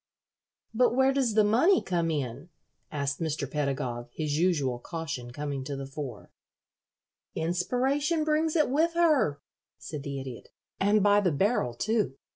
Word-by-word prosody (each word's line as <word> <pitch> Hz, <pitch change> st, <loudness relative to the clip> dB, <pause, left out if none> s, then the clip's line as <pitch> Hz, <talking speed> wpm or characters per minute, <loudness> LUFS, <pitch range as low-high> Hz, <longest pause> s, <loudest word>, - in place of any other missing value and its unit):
"But 245 Hz, +1 st, +3 dB
where 265 Hz, +1 st, +4 dB
does 255 Hz, -6 st, +1 dB
the 215 Hz, -, +6 dB
money 255 Hz, -, +4 dB
come 170 Hz, -2 st, -1 dB
in?" 145 Hz, +1 st, -3 dB, 0.4 s
asked 140 Hz, -1 st, -2 dB
Mr. 155 Hz, -3 st, -2 dB
Pedagog, 130 Hz, -4 st, -2 dB
his 150 Hz, +1 st, -2 dB
usual 150 Hz, -7 st, +1 dB
caution 160 Hz, -4 st, -5 dB
coming 140 Hz, +1 st, -4 dB
to 140 Hz, -, -4 dB
the 135 Hz, 0 st, -5 dB
fore. 135 Hz, -5 st, -7 dB, 1.0 s
"Inspiration 260 Hz, -, 0 dB
brings 310 Hz, +1 st, +1 dB
it 305 Hz, -2 st, +4 dB
with 325 Hz, +4 st, +2 dB
her," 295 Hz, -, +3 dB, 0.4 s
said 150 Hz, -3 st, -7 dB
the 140 Hz, -1 st, -5 dB
Idiot, 130 Hz, -3 st, -8 dB, 0.3 s
"and 205 Hz, +1 st, +3 dB
by 205 Hz, 0 st, +5 dB
the 180 Hz, -4 st, +2 dB
barrel, 155 Hz, -, +1 dB
too. 215 Hz, -, 0 dB
165 Hz, 145 wpm, -28 LUFS, -, 1.0 s, the